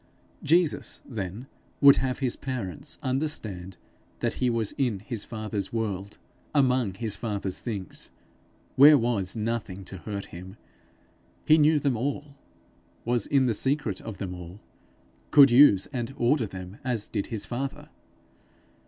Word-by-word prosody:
Jesus, 170 +1 +1
then, 105 0 -5 0.3
would 140 -1 +8
have 130 -1 -1
his 130 -3 -1
parents 130 - -5
understand 115 - -3 0.4
that - - -1
he 125 - +3
was 115 -3 0
in 120 -8 -1
his 110 -1 -4
father's 110 -3 -4
world 100 -3 -3 0.4
among 125 -8 +2
his 110 -1 -3
father's 100 -4 -3
things, 105 -6 -5 0.7
where 145 +3 +9
was 115 -6 -1
nothing 105 -4 -3
to 95 - -8
hurt 100 +2 -6
him; 90 +2 -9 0.9
he 155 +1 +6
knew 155 +1 +5
them 140 -3 +1
all, 140 +4 -3 0.7
was 120 -2 0
in 135 -2 +3
the 120 - +2
secret 130 -4 -1
of 110 -4 -7
them 90 -2 -5
all, 90 +2 -10 0.7
could 140 -2 +8
use 120 -7 +7
and 120 +1 -4
order 120 -1 +2
them 95 +1 -9
as 120 -5 -1
did 100 -3 -3
his 110 -4 -4
father. 135 +3 -5
115 Hz, 140 wpm, -27 LUFS, 100-135 Hz, 0.9 s, where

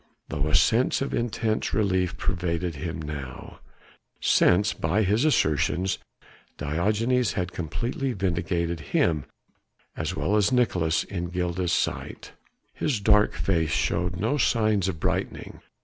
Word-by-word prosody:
Though 75 +1 -1
a 75 - +1
sense 115 +9 +3
of 140 - -4
intense 110 -3 -1
relief 95 -4 +1
pervaded 85 -1 -1
him 80 +2 -4
now, 75 -4 -7 0.6
since 100 +4 +3
by 95 +7 0
his 105 +8 +2
assertions 95 - +1 0.6
Diogenes 105 - +1
had 90 -3 -2
completely 120 - -3
vindicated 85 -3 -1 0.2
him 75 -5 +2 0.7
as 80 +3 -3
well 105 - 0
as 105 +2 +3
Nicolaes 90 -10 +2
in 90 -3 -4
Gilda's 90 0 -2
sight, - - -2 0.4
his 135 -8 -1
dark 105 +1 +4
face 80 -5 0
showed 90 +4 0
no 115 +9 0
signs 110 -6 +2
of 85 -5 -3
brightening. - - -3
90 Hz, 125 wpm, -26 LUFS, 85-110 Hz, 0.7 s, dark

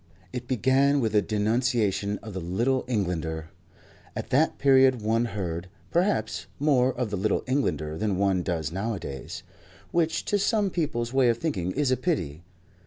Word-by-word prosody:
It 125 0 -5
began 130 +3 +3
with 110 -4 0
a 105 - +5
denunciation 105 -2 0
of 110 -2 -8
the 95 - -3
Little 115 +10 0
Englander. 85 -8 -2 0.6
At - - -5
that 150 +5 +3
period 130 -4 +4
one 115 +2 +2
heard, 90 -5 -4 0.2
perhaps, 110 - 0
more 135 -3 +3
of 125 -4 -3
the 100 - -1
Little 100 +2 0
Englander 80 - -1
than 105 -3 0
one 95 -2 +2
does 80 -4 -2
nowadays 95 -8 -5 0.5
which 165 -2 +1
to 205 - +1
some 205 -1 +1
people's 120 -9 -2
way 130 -2 +4
of 115 - +2
thinking 95 - -2
is 145 -2 +1
a 130 - +3
pity. 85 - -2
115 Hz, 160 wpm, -26 LUFS, 95-130 Hz, 0.6 s, a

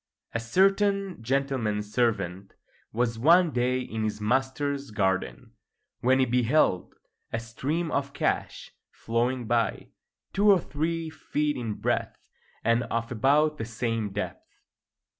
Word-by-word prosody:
A 115 - 0
certain 195 - +2
gentleman's 115 -5 -1
servant 100 -6 -1 0.4
was 115 0 -1
one 170 +5 +5
day 125 0 +1
in 110 -3 -4
his 110 0 -2
master's 135 +5 -1
garden, 95 -3 -1 0.5
when 130 +2 +3
he 130 - +3
beheld 125 - +2 0.4
a 115 - -1
stream 145 +9 -3
of 140 0 -1
cash - - -2 0.2
flowing 120 +2 -1
by, 115 -3 0 0.4
two 205 +2 +4
or 195 -2 +7
three 160 +1 -3
feet 150 -1 -1
in 115 -4 -3
breadth - - -1 0.5
and 115 +1 +3
of 115 +2 -3
about 145 +6 +2
the - - -2
same 115 -2 -2
depth. 100 - -5
125 Hz, 125 wpm, -27 LUFS, 115-150 Hz, 0.5 s, or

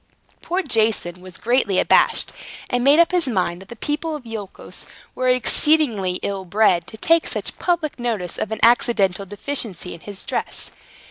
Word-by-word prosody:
Poor 370 +3 -1
Jason 220 - 0
was 185 -2 -11
greatly 230 -5 +1
abashed, - - +3 0.4
and 245 0 +1
made 280 +3 +6
up 340 0 +5
his 355 -5 +1
mind 185 -6 -1
that 195 - -14
the 235 - -8
people 300 +6 -3
of 285 -5 -9
Iolchos 220 -4 -6 0.3
were 255 0 0
exceedingly 250 -5 +2
ill 195 -1 -2
bred, 185 -1 +2
to 220 - -10
take 330 +8 +3
such - - -3
public 335 -6 -1
notice 220 -8 -3
of 215 - -3
an 220 - -3
accidental 200 -5 +3
deficiency 205 - -3
in 170 - -10
his 200 +2 -10
dress. - - -3
225 Hz, 165 wpm, -21 LUFS, 195-280 Hz, 0.4 s, made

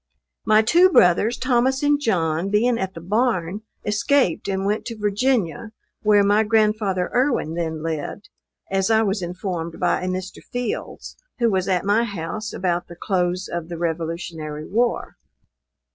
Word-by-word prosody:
My 215 0 +5
two 350 +11 +5
brothers, 210 - +4
Thomas 260 +1 +1
and 290 0 +3
John, 170 - 0
being 230 +4 +2
at 190 0 -3
the 165 - -7
barn, 205 -1 0 0.2
escaped 210 - +1
and 195 0 -1
went 210 +2 0
to 230 -2 -6
Virginia, 210 - 0 0.3
where 210 -1 +4
my 205 +2 +4
grandfather 215 -4 +1
Erwin 250 - +1
then 160 -2 -3
lived, 165 +5 -4 0.4
as 195 +1 +1
I 220 0 +4
was 200 -1 -1
informed 175 -2 -4
by - - +1
a 185 - -3
Mr. 185 +1 -4
Fields, 245 -1 -5 0.2
who 235 -3 +2
was 190 -1 0
at 185 -1 0
my 210 +3 +3
house 215 +1 -4
about 175 -1 -1
the 170 - -11
close 180 0 -1
of 170 -1 -5
the 170 - -5
revolutionary 160 -2 -4
war. 235 +6 -1
195 Hz, 155 wpm, -22 LUFS, 175-225 Hz, 0.4 s, My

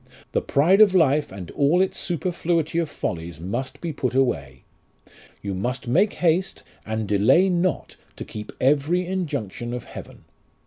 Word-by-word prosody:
The - - +1
pride 175 +9 +3
of 200 -3 +6
life 150 -4 +3
and 95 -2 -8
all 145 +5 +2
its 190 0 0
superfluity 170 -2 -1
of 165 -3 -1
follies 85 - -5
must 120 +10 -4
be 170 -2 -3
put 130 -3 -2
away. 70 - 0 0.8
You 100 -1 -3
must 125 +8 -3
make 185 - +3
haste 180 +3 0 0.2
and 110 -1 -2
delay 120 - +4
not 180 0 -1 0.2
to - - -7
keep 105 0 -8
every 150 +7 +2
injunction 125 - -3
of 125 - -6
heaven. - - -11
140 Hz, 150 wpm, -23 LUFS, 110-175 Hz, 0.8 s, of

